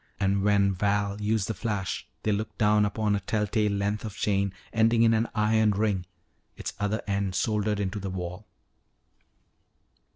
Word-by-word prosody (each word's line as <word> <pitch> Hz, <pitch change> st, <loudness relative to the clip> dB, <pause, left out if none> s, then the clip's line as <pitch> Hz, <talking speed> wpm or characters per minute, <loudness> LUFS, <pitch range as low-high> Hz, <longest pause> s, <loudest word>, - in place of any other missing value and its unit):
And 100 Hz, 0 st, +2 dB
when 100 Hz, -1 st, +3 dB
Val 100 Hz, +1 st, 0 dB
used 105 Hz, -1 st, +1 dB
the 110 Hz, -, -1 dB
flash 100 Hz, -7 st, -3 dB, 0.2 s
they 110 Hz, -, +1 dB
looked 105 Hz, +2 st, -3 dB
down 105 Hz, -1 st, +4 dB
upon 105 Hz, 0 st, 0 dB
a -, -, 0 dB
telltale 105 Hz, +1 st, 0 dB
length 100 Hz, +1 st, -1 dB
of 110 Hz, -2 st, -6 dB
chain 100 Hz, -2 st, +1 dB, 0.2 s
ending 115 Hz, +1 st, +4 dB
in 115 Hz, 0 st, +5 dB
an 115 Hz, +1 st, +1 dB
iron 110 Hz, 0 st, +3 dB
ring, 100 Hz, -3 st, 0 dB, 0.5 s
its -, -, -5 dB
other 105 Hz, +1 st, -1 dB
end 100 Hz, -2 st, -1 dB
soldered 105 Hz, -1 st, 0 dB
into 100 Hz, +1 st, -2 dB
the 100 Hz, 0 st, -4 dB
wall. 90 Hz, +2 st, -6 dB
105 Hz, 160 wpm, -27 LUFS, 100-110 Hz, 0.5 s, in